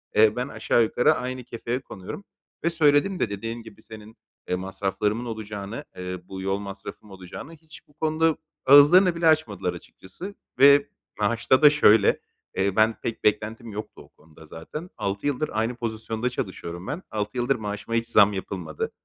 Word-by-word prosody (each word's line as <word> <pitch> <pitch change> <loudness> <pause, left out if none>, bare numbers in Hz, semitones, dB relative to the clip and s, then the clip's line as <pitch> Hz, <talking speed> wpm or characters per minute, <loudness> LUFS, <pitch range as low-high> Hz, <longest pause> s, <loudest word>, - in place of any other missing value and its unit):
eee, 110 0 +5
ben 125 +2 -2
aşağı 120 - +1
yukarı 120 +2 +3
aynı 125 0 -4
kefeye 120 +2 -4
konuyorum 100 - -9 0.4
ve 170 - +3
söyledim 160 +3 +3
de 110 - 0
dediğim 115 +3 -5
gibi, 110 -3 -14
senin 110 0 -12 0.4
masraflarımın 100 +4 -2
olacağını, 110 +2 -6
eee, 90 0 -5
bu, 95 0 -6
yol 95 +1 -1
masrafım 100 +1 -9
olacağını; 95 - -10
hiç 160 -1 -15
bu 145 - -26
konuda 160 +1 +1 0.3
ağızlarını 155 +7 +7
bile 170 0 +1
açmadılar 105 - +1
açıkçası. 180 - -10 0.2
Ve 140 +1 +7 0.3
maaşta 115 +5 +2
da 150 - +10
şöyle: 110 -8 +4 0.4
Eee, 95 0 +1
ben 110 +1 +4
pek 115 - -4
beklentim 110 +2 0
yoktu 105 +1 -8
o - - -21
konuda 80 0 -19
zaten. 115 - -8
6 100 +6 -2
yıldır 145 +2 -1
aynı 115 +3 -1
pozisyonda 115 0 -3
çalışıyorum 90 -5 -6
ben. 160 +5 -4
6 105 +3 -3
yıldır 125 +3 +1
maaşıma 105 +1 -4
hiç 115 0 0
zam 105 -2 +5
yapılmadı. 90 -5 -5
110 Hz, 160 wpm, -25 LUFS, 100-140 Hz, 0.4 s, da